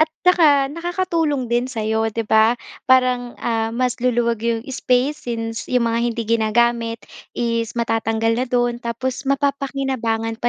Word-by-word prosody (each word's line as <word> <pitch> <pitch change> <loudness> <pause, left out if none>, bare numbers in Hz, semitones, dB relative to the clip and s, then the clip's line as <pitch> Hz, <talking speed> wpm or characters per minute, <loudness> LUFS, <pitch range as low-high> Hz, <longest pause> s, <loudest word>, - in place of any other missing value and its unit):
At 315 - +4 0.2
saka 310 -6 +5
nakakatulong 335 -5 -1
din 240 +2 0
sa'yo 220 -2 -1
'di 225 +1 -3
ba, 220 +3 +4 0.3
parang, 250 -1 +3
ah, 225 -1 -1
mas 250 +2 -1
luluwag 235 -2 +1
yung 230 0 -1
space 255 +1 -1
since 225 -1 -4
yung 250 -2 +2
mga 230 - +1
hindi 230 0 -3
ginagamit 230 +1 +1 0.3
is 230 -1 -1
matatanggal 225 -1 0
na 245 +3 0
do'n 240 -1 0
tapos 255 +3 -4
mapapakinabangan 270 -5 -1
pa 240 - +2
240 Hz, 145 wpm, -20 LUFS, 230-260 Hz, 0.3 s, saka